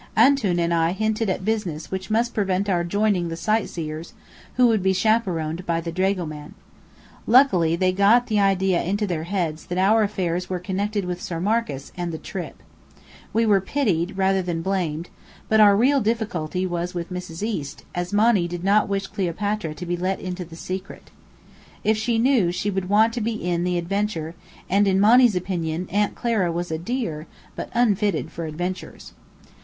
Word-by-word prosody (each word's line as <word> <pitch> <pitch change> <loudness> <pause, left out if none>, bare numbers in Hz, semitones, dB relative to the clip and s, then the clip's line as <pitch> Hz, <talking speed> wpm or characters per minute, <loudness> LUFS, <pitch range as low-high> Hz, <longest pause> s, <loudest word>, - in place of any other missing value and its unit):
"Antoun" 240 -11 +4
and 170 0 +1
I 165 +1 +2
hinted 215 +1 -1
at 185 0 -2
business 200 -8 -2
which 190 +1 -4
must 230 +2 +1
prevent 195 -1 0
our 175 -3 +1
joining 200 0 +1
the 165 - -4
sightseers, 165 -5 -2 0.4
who 250 - +5
would 225 -4 +3
be 190 +1 +2
chaperoned 185 -5 0
by 165 -1 +1
the 165 0 -5
dragoman. 170 -5 -2 0.7
Luckily, 205 - +5
they 185 +1 +2
got 200 +6 +4
the 215 -3 0
idea 190 -2 +2
into 205 +4 -1
their 165 -5 -3
heads 170 -4 -3
that 180 0 -3
our 205 +4 +4
affairs 180 -4 -1
were 185 - -1
connected 195 +2 -2
with 180 0 -4
Sir 170 -2 -4
Marcus, 200 -8 -1
and 175 -1 -3
the 160 - -4
"trip." 180 +2 -7 0.7
We 230 +1 +2
were 200 -3 +4
pitied, 190 - -1
rather 190 0 +2
than 170 -2 -3
blamed, 175 -4 -2 0.4
but 220 - +3
our 205 -2 +7
real 270 +5 +3
difficulty 190 -6 -1
was 175 0 -3
with 175 +1 -4
Mrs. 180 0 -6
East, 155 -11 -4
as 175 0 -3
Monny 205 -3 +3
did 175 0 -6
not 200 +2 +3
wish 195 0 -1
Cleopatra 195 -2 -2
to 180 - -7
be 175 0 -1
let 185 +2 -2
into 180 0 -5
the 165 -1 -12
secret. 185 +3 -7 0.7
If 220 - +3
she 225 +2 0
knew, 230 -7 +3
she 195 +4 -2
would 190 -1 -3
want 220 +3 +4
to 240 - -3
be 225 +2 -1
in 175 -5 -2
the 180 0 0
adventure, 175 -2 -2 0.3
and 200 +2 +3
in 190 0 +3
Monny's 230 +1 +6
opinion, 175 -2 -2
Aunt 205 +2 +1
Clara 220 -8 0
was 175 0 -3
a 160 - -2
dear, 170 -7 -3 0.3
but - - -5
unfitted 205 -8 +1
for 165 0 -5
adventures. 180 +4 -6
190 Hz, 180 wpm, -23 LUFS, 170-210 Hz, 0.7 s, our